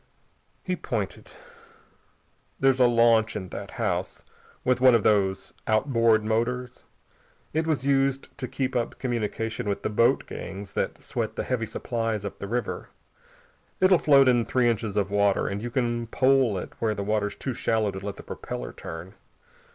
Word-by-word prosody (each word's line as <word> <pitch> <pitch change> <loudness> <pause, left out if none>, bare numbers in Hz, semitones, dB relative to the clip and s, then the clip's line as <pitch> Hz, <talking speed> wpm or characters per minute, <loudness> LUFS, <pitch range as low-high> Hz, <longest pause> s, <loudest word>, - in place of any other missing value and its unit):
He - - -1
pointed. - - -4 1.3
"There's 135 -1 +3
a 125 - +6
launch 115 -1 +4
in 95 - -5
that - - -7
house, - - -2 0.4
with 125 -1 +1
one 130 -2 +7
of 115 - +2
these 95 -3 +1
outboard 115 -1 +3
motors. 120 +3 -2 0.7
It 160 +1 0
was 145 -5 0
used 135 -1 +1
to 130 - -3
keep 130 0 -2
up 120 -1 -1
communication 115 -2 -2
with 100 - -2
the - - -1
boat 115 +2 +3
gangs 95 0 -7
that - - -2
sweat - - -3
the - - -2
heavy 120 -3 -1
supplies 115 -3 -2
up 100 - -6
the 100 - -5
river. 120 0 -3 0.9
It'll 185 -2 +5
float 140 -3 +6
in 120 -2 +4
three 125 +1 +1
inches 110 -3 -1
of 100 -1 0
water, 100 -1 +2
and 100 +1 -3
you 120 - -4
can 120 -1 -1
pole 130 -3 +3
it - - -6
where 110 -2 0
the 100 - -3
water's 105 0 -1
too 130 - -4
shallow 110 -2 0
to 95 0 -8
let 100 -1 -4
the - - -11
propeller - - -6
turn. 85 +4 -8
115 Hz, 165 wpm, -26 LUFS, 105-125 Hz, 1.3 s, one